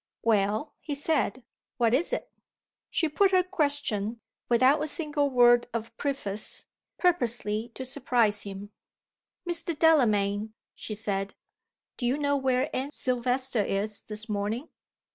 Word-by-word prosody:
"Well," 215 +3 +1
he 295 - -3
said, 280 -3 0 0.3
"what 235 -2 +3
is 300 - +1
it?" - - -3 0.6
She 325 - +1
put 390 +6 +3
her 370 -1 +4
question, 285 - -1 0.3
without 260 +5 +4
a - - -2
single 295 -2 -1
word 240 -2 +5
of 230 0 -4
preface 215 -8 -2 0.3
purposely 235 - +1
to 260 - -5
surprise 245 -5 +2
him. 200 +1 -7 0.8
"Mr. 335 -2 -1
Delamayn," 215 -9 +3 0.2
she 215 - -6
said, 200 -2 -2 0.6
"do 245 - -1
you 260 +4 +1
know 285 -1 +1
where 260 -2 0
Anne 265 +2 -1
Silvester 255 -2 0
is 205 +1 -2
this 215 +1 -4
morning?" 215 +6 -2
245 Hz, 130 wpm, -28 LUFS, 215-290 Hz, 0.8 s, word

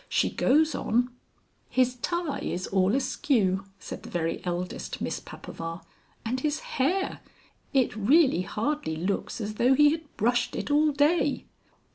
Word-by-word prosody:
She - - +1
goes 310 +4 +3
on 245 +3 0 0.3
" - - -41 0.3
"His 255 -1 +2
tie 345 +3 -2
is 180 - -3
all 190 +3 +2
askew," 215 -8 +1
said - - -8
the - - -10
very 165 -1 -2
eldest 180 0 -4
Miss - - -2
Papaver, 165 +1 -7 0.4
"and 250 +3 -1
his 295 +2 -1 0.2
hair! 375 +8 +1 0.5
It 260 -5 +2
really 255 - +4
hardly 220 - -2
looks 185 +8 -2
as 215 -1 -3
though 255 +2 +5
he 295 +1 +6
had 320 -2 -6
brushed 240 +3 +1
it - - -3
all 300 +1 +4
day." 290 +1 +2
250 Hz, 150 wpm, -27 LUFS, 195-295 Hz, 0.5 s, he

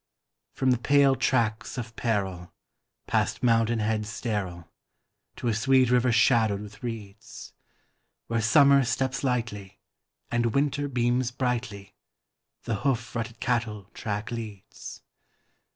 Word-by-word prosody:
From 130 -1 +2
the 125 - +2
pale 140 +1 +4
tracts 120 -2 0
of 115 -2 -6
peril, 95 -6 -2 0.5
past - - -1
mountain 115 -1 +3
heads 105 0 -1
sterile, 95 -8 -4 0.7
To - - -4
a 115 - +2
sweet 130 +2 +3
river 125 0 +3
shadowed 110 -3 +3
with 105 +1 -11
reeds, 110 -4 -8 0.7
Where 115 -1 -1
Summer 140 +3 +5
steps 130 +2 -1
lightly, 115 -7 -3 0.5
and 120 -1 0
Winter 145 0 +1
beams 125 -1 0
brightly, 120 -6 -3 0.7
The 115 -3 -2
hoof 115 -1 -1
rutted 115 0 -4
cattle 110 -5 -2
track 105 -1 -4
leads. 110 -5 -8
115 Hz, 120 wpm, -27 LUFS, 105-125 Hz, 0.7 s, Summer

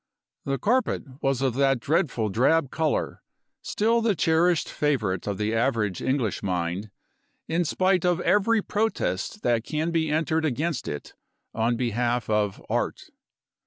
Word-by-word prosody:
The 135 0 0
carpet 250 - +1 0.2
was 135 -1 0
of 130 -3 +1
that 135 0 +2
dreadful 135 - 0
drab 130 +7 +2
color, 160 -2 -1 0.4
still 230 +2 +1
the 225 -3 +2
cherished 165 +1 +2
favorite 110 - -1
of 100 -2 -2
the 105 +2 -1
average 115 -5 0
English 130 -5 0
mind, 90 +2 -2 0.6
in 170 +2 +1
spite 185 +2 +2
of 180 -1 +2
every 210 +3 +3
protest 215 0 -2
that 120 -2 +2
can 155 +5 -2
be 160 -2 +1
entered 160 +1 +1
against 155 +1 -1
it, 75 - -6 0.4
on 115 +2 +1
behalf 120 -1 -1
of 105 -2 0
Art. - - -2
135 Hz, 140 wpm, -25 LUFS, 115-170 Hz, 0.6 s, every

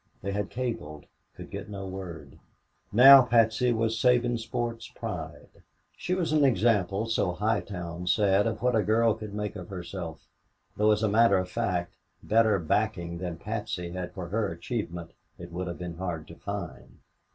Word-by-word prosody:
They 100 - -2
had 100 0 -2
cabled 110 -12 -4 0.3
could - - -10
get 100 +1 -6
no 100 -1 -6
word. 95 -3 -8 0.5
Now 135 +5 +10
Patsy 115 0 +3
was 115 -1 0
Sabinsport's 120 -1 0
pride. - - -7 0.4
She 180 - -2
was 170 -4 -1
an 150 -2 +4
example, 105 -5 +2
so 110 -5 0
High 105 +3 0
Town 90 -2 -6
said, 100 +3 +3
of 110 +1 -3
what 125 -1 +3
a 110 - +4
girl 110 +3 +3
could 110 -2 -8
make 105 0 -3
of 90 -3 -8
herself, 90 -3 -7 0.5
though 105 +1 +3
as 105 +1 +1
a - - +4
matter 115 +2 +4
of 90 0 -2
fact 90 -2 -2 0.3
better 110 -1 +3
backing 85 0 -1
than 90 -2 -4
Patsy 100 -4 -4
had 90 0 -5
for 90 -4 -6
her 105 0 -1
achievement 85 -1 -5 0.3
it 85 -1 -10
would 90 0 -4
be 90 -1 -5
hard 85 -2 -5
to 85 - -10
find. 100 -4 -7
100 Hz, 165 wpm, -28 LUFS, 90-115 Hz, 0.5 s, Now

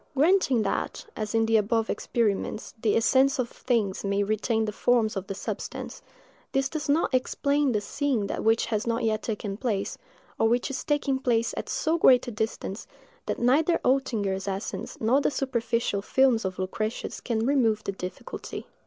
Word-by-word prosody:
Granting 285 - +3
that, - - -2
as 215 0 -3
in 225 0 +3
the 225 0 +4
above 220 +1 +1
experiments, 215 -1 -1
the 215 - +2
essence 265 +4 +3
of 250 -2 -1
things 220 -7 -1
may 200 0 +1
retain 220 +2 0
the 210 - -2
forms 225 0 +2
of 195 0 -4
the 195 - -4
substance, - - -5 0.5
this 270 0 +1
does 300 -1 -4
not 295 -1 +2
explain 280 +2 +1
the 210 -3 0
seeing 260 -1 -1
that - - -3
which 225 +1 +3
has 215 0 -2
not 230 +1 0
yet 215 -1 +1
taken 205 -3 -4
place, 210 -5 -2 0.4
or 225 - +4
which 245 +3 +1
is 265 - -4
taking 280 -3 0
place 235 -3 +1
at - - -5
so 325 +2 0
great 250 -6 +6
a - - -3
distance, 220 -1 -4 0.4
that - - -1
neither 295 +8 +3
Oetinger's 205 -8 0
essence 195 +1 -4
nor 245 +6 +3
the - - +2
superficial 235 -6 -1
films 245 0 +3
of 185 -1 -3
Lucretius 215 +4 -3
can 225 -2 -1
remove 230 -6 +2
the - - -2
difficulty. 185 -1 -7
230 Hz, 175 wpm, -27 LUFS, 210-265 Hz, 0.5 s, great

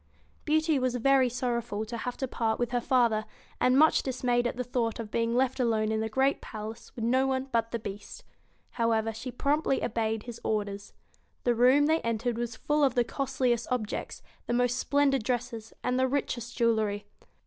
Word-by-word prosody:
Beauty 315 -1 +2
was 255 -1 0
very 260 +1 +4
sorrowful 235 -3 -2
to 230 +2 -6
have 245 +2 -4
to 265 - -2
part 225 -2 -1
with 240 -1 -1
her 245 -1 0
father, 235 -4 +2 0.4
and 255 +1 +4
much 315 +2 +5
dismayed 245 -2 0
at 245 - -4
the 250 - -1
thought 235 -2 -2
of 220 -2 -6
being 230 +1 0
left 260 +1 +1
alone 220 -3 +1
in 220 - 0
the 220 0 -1
great 265 +4 +1
palace 215 0 -8
with 225 - -3
no 260 +3 +3
one 265 0 -1
but 230 -1 +1
the 235 - -2
Beast. 205 -2 -8 0.5
However, 225 -1 +1
she 230 +4 -6
promptly 280 +2 0
obeyed 220 -1 -1
his 240 -2 -9
orders. 205 -2 -3 0.5
The 245 - +3
room 255 +5 +5
they 320 +2 +2
entered 230 +1 -1
was 240 -1 -3
full 295 +6 0
of 265 -3 +3
the 245 - +4
costliest 250 -1 -1
objects, 245 -5 -3 0.2
the - - 0
most 245 +1 +1
splendid 275 -1 +2
dresses, 230 -2 -3
and 250 +1 0
the 260 - +3
richest 245 -3 -3
jewelry. 220 -3 +1
240 Hz, 190 wpm, -29 LUFS, 225-260 Hz, 0.5 s, much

